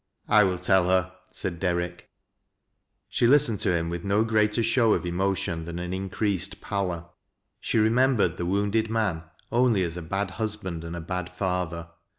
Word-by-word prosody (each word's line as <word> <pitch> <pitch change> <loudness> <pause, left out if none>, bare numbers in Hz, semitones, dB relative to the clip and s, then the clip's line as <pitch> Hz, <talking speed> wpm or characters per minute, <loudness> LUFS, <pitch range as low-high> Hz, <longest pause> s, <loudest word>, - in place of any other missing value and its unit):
" - - -52
I 105 - +6
will 95 -2 +1
tell 90 0 +3
her," 95 0 +1 0.2
said 85 -3 -4
Derrick. 90 0 -2 1.0
She 120 - +2
listened 135 -6 +4
to - - +1
hira 85 -2 +1
with 85 0 -4
no 100 +2 +2
greater 110 0 +2
show 115 -1 +3
of - - -3
emotion 90 -2 -1
than 85 0 -6
an 90 +1 -4
increased 95 -1 -2
pallor. 90 -5 -3 0.5
She - - -1
remembered 110 -5 +3
the 85 - -2
wounded 105 +3 +1
man 105 -7 0 0.3
only 120 -5 +3
as 85 0 -3
a - - -4
bad 95 +3 -2
husband 105 -6 -4
and 85 +1 -6
a 85 - -5
bad 90 +1 -4
father. 90 -3 -3
95 Hz, 170 wpm, -26 LUFS, 85-105 Hz, 1.0 s, I